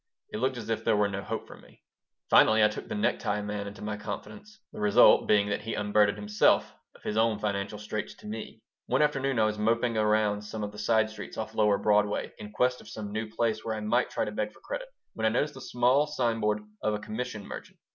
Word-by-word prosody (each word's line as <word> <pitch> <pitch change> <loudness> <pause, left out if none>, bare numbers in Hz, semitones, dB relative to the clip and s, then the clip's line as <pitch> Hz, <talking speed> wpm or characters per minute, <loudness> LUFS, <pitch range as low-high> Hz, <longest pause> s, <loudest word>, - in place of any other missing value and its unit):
It - - -3
looked 130 +1 0
as 115 -1 -5
if 110 - -1
there 105 - +3
were 105 0 +3
no 100 0 -4
hope 110 +2 -4
for - - -12
me - - -20 0.4
Finally 110 0 +6
I 105 - +6
took 105 - -7
the 225 - -4
necktie 105 - 0
man 105 -1 -4
into 100 +1 -9
my 105 0 -3
confidence, 110 - -8
the - - -8
result 105 -1 +6
being 105 -1 +4
that 105 - -1
he 115 +1 -4
unburdened 105 0 +2
himself 105 0 +2 0.2
of - - -19
his 105 - -2
own 110 -1 +3
financial 100 0 -2
straits 105 0 -5
to - - -17
me 110 +1 -7 0.2
One 130 +4 +3
afternoon 135 -3 0
I 110 - +4
was 105 0 -1
moping 115 +2 +1
around 105 -1 +2
some 105 +1 -6
of 105 - -4
the 105 - -10
side 110 0 +2
streets 110 - -9
off 110 0 -4
lower 105 -2 +3
Broadway 105 0 +1
in 105 - -8
quest 125 +3 +1
of - - -13
some 105 -2 -6
new 110 +1 -3
place 110 0 -1
where 110 -1 -2
I - - -4
might 120 +4 +1
try - - -1
to - - -4
beg - - -2
for - - -21
credit, - - -5 0.3
when 110 0 0
I - - +4
noticed 135 +6 0
the 135 - -10
small 125 +5 +2
sign 120 -6 0
board 105 0 +1 0.2
of 105 0 0
a - - -4
commission 110 0 -5
merchant. - - -9
110 Hz, 240 wpm, -28 LUFS, 105-115 Hz, 0.4 s, Finally